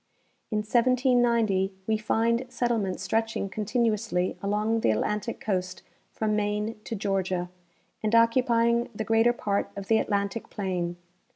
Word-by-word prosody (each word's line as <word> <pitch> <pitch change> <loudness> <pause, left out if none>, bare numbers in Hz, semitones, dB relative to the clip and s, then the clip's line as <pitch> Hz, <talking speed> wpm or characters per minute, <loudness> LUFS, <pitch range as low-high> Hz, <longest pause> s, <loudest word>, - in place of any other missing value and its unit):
In 210 -2 -1
1790 235 -5 +2
we 220 - +1
find 230 +3 +1
settlement 225 -8 -1
stretching 220 +1 -1
continuously 215 -3 0
along 210 +3 0
the - - +2
Atlantic 210 - -1
coast 185 -3 -3 0.3
from 215 -1 -1
Maine 210 +1 -1
to 230 - -4
Georgia, 190 -3 -1 0.5
and 215 +1 +1
occupying 235 0 +3
the 220 - -2
greater 225 +2 +4
23art 200 -4 -1
of 200 -1 -7
the 220 -1 +5
Atlantic 200 +1 -2
plain. 180 -3 -2
215 Hz, 125 wpm, -27 LUFS, 195-230 Hz, 0.5 s, the